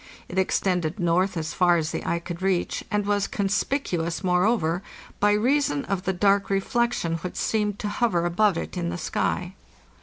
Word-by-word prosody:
It 185 - -2
extended 180 -1 0
north 175 +2 +1
as 160 0 -3
far 175 -1 +4
as 160 -1 -1
the - - -4
eye 170 - 0
could 170 +1 -7
reach, 185 -2 0
and 210 -1 0
was 205 -1 +1
conspicuous, 195 - -1
moreover, 180 -2 +2 0.4
by 205 0 +4
reason 235 - +1
of 195 0 -2
the 190 - +2
dark 200 +2 +3
reflec 235 +5 +1
tion 165 -7 -1
which 180 +2 -6
seemed 210 -2 0
to 210 - -4
hover 205 -5 +1
above 185 +2 +2
it - - -5
in 175 -1 -2
the 175 - -3
sky. 180 +2 -2
185 Hz, 180 wpm, -25 LUFS, 170-205 Hz, 0.4 s, far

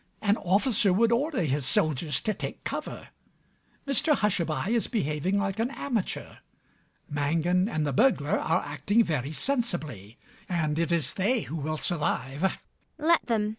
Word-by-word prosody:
An 205 -1 +2
officer 205 +2 +2
would 225 +5 +3
order 265 - +1
his 145 -1 0
soldiers 150 0 +1
to 215 - 0
take - - -6
cover. - - -5 0.8
Mr 290 +2 +3
Hushabye 185 - 0
is 235 -1 +1
behaving 185 - 0
like 200 +1 -1
an 230 +2 +1
amateur. 250 -7 -3 0.7
Mangan 165 +6 +1
and 155 -7 -1
the 140 - -1
burglar 150 - +3
are 165 +3 +1
acting 150 - +1
very 150 - -2
sensibly; 155 - -2 0.3
and 160 -3 0
it 170 0 0
is 170 -3 +1
they 220 +5 +1
who 160 - -6
will 155 0 -2
survive. 150 -4 -1
ELLIE. 190 - +1 0.4
Let 325 +2 +2
them. 215 -3 +1
180 Hz, 150 wpm, -27 LUFS, 150-225 Hz, 0.8 s, would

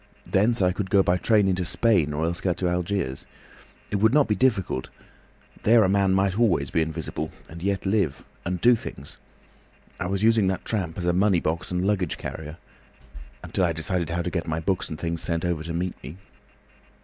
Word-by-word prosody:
Thence 105 +2 +2
I 90 - +3
could 95 0 -4
go 100 0 +4
by 90 0 +2
train 105 0 +3
into 95 -1 0
Spain, 90 -4 +2
or 75 +2 -1
else 85 +1 -2
get 90 -3 0
to 90 - 0
Algiers. 90 -5 -2 0.6
It 105 - +1
would 110 +6 +3
not 150 -2 +5
be 105 - +2
difficult. 100 - 0 0.7
There 115 +1 +5
a 95 - +2
man 95 -1 +3
might 95 +2 +1
always 85 - +2
be 80 - +2
invisible—and 80 +1 -5
yet 100 +1 -1
live. 95 -9 0 0.2
And 90 0 -2
do 120 +7 +6
things. 70 -10 -8 0.8
I 90 - -2
was 100 +2 -2
using 110 -3 +4
that 95 -1 -2
tramp 90 -7 -2
as 85 - -3
a 85 - +2
money 95 0 +3
box 80 +2 -2
and 90 +1 -1
luggage 95 -5 0
carrier, 80 0 -7 0.9
until 95 - -1
I 85 -2 +2
decided 80 +2 -2
how 85 +1 -1
to 90 - -3
get 85 -2 -3
my 80 0 -1
books 90 +3 -1
and 80 - -5
things 85 -1 -2
sent 85 0 0
over 85 -3 -1
to 85 +1 -6
meet 90 +2 -2
me." 70 +7 -9
90 Hz, 200 wpm, -25 LUFS, 85-100 Hz, 0.9 s, do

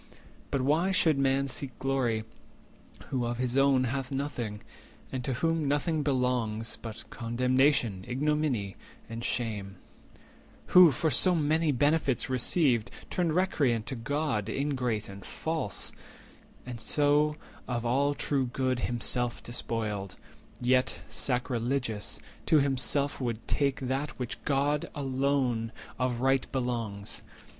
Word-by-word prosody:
But 135 - 0
why 155 +7 +3
should 165 -6 +3
man 135 0 +2
seek 135 -1 -4
glory, 130 -5 0 0.9
who 130 -2 0
of 120 0 -2
his 125 0 -1
own 135 -1 +4
Hath 130 +1 -2
nothing, 125 -7 -3 0.5
and 130 -1 -3
to 130 - -1
whom 165 +3 0
nothing 150 +2 +1
belongs 125 -5 0
But 110 -2 -8
condemnation, 125 -3 +2
ignominy, 135 -7 0 0.3
and 115 +1 -6
shame— 105 -6 -2 1.0
Who, 180 -2 +10
for 155 +3 0
so 180 +3 +4
many 155 0 +2
benefits 140 -2 +2
received, 130 -2 +2 0.2
Turned 170 -3 +1
recreant 140 - +2
to 130 - -4
God, 130 -3 -1
ingrate 125 -5 -1
and 100 0 -10
false, 160 -10 -2 0.7
And 120 -2 -6
so 150 +4 +2 0.3
of 120 -1 -2
all 140 +4 +2
true 135 -3 0
good 130 0 0
himself 120 0 -1
despoiled; 105 -5 -3 0.4
Yet, 130 +1 +1
sacrilegious, 125 -3 -2 0.3
to 160 - +6
himself 140 0 +1
would 115 -3 -3
take 140 -2 +1
140 - - -3 0.3
That - - -18
which 125 -2 -4
to - - -28
God 145 +1 +1
alone 130 -4 0 0.3
of 125 -2 0
right 135 0 +2
belongs? 115 -6 -2
130 Hz, 125 wpm, -29 LUFS, 120-145 Hz, 1.0 s, Who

